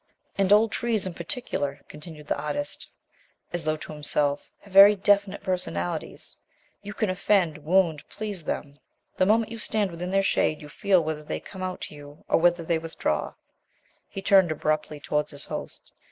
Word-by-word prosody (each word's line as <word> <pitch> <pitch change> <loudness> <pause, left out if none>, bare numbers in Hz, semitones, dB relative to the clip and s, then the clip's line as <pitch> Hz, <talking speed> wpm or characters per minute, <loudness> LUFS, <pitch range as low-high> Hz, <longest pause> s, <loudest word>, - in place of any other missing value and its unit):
"And 195 -1 +1
old 215 +2 +6
trees 230 -4 0
in 185 - -4
particular," 165 - -4
continued 150 0 -11
the - - 0
artist, 285 - -4 0.6
as 175 -2 -1
though 155 0 +1
to 155 - -7
himself, 145 -1 0
"have 200 -1 -17
very 200 +2 +9
definite 200 0 +2
personalities. 90 - -3 0.4
You 205 0 -8
can 215 -4 0
offend, 185 -4 +1
wound, 160 -1 +1
please 205 -6 -5
them; 145 -1 -4 0.4
the 185 - +3
moment 225 +1 +3
you 230 - -6
stand 210 -3 0
within 175 +2 -5
their 195 +1 +2
shade 155 -5 +1
you 150 - -11
feel 185 +2 +2
whether 155 -1 -3
they - - -4
come 190 - -10
out 185 0 -4
to - - -6
you, 145 0 -13
or - - +3
whether 175 0 +3
they 165 0 0
withdraw." 165 0 -2 0.7
He 195 - -7
turned 190 -4 +5
abruptly 155 0 -1
towards 150 0 -1
his 145 -1 -8
host. - - -7
175 Hz, 175 wpm, -26 LUFS, 150-200 Hz, 0.7 s, very